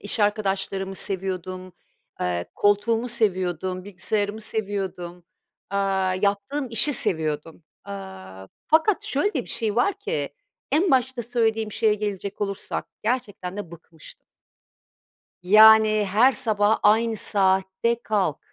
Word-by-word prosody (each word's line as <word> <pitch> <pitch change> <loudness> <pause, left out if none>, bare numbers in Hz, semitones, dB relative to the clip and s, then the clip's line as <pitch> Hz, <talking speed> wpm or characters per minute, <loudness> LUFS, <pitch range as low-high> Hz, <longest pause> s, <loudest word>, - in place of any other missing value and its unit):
iş 205 +2 -2
arkadaşlarımı 195 -2 -1
seviyordum, 185 -1 -4 0.5
eee, 90 -1 -1
koltuğumu 225 +4 +1
seviyordum, 185 -4 -1
bilgisayarımı 205 +2 -2
seviyordum, 190 -5 -4 0.5
aaa, 195 -1 0
yaptığım 200 +8 -1
işi 230 +6 +2
seviyordum. 160 - 0 0.2
Aaa, 95 -1 -9 0.2
fakat 325 +6 +3
şöyle 350 +9 0
de 260 - -1
bir - - -17
şey 220 -2 -2
var 380 +12 +1
ki 430 +4 -3 0.4
-en 335 +5 +3
başta 260 -1 +1
söylediğim 225 -2 0
şeye 220 -2 +2
gelecek 200 -2 -5
olursak 200 -1 -3 0.2
gerçekten 205 -5 -3
de 205 -5 -6
bıkmıştım. 165 -2 -15 1.2
Yani, 215 +2 +7
her 245 +7 +5
sabah 215 -2 +2
aynı 225 +2 +3
saatte 195 +4 0
kalk, 195 -8 0
205 Hz, 115 wpm, -24 LUFS, 185-225 Hz, 1.2 s, Yani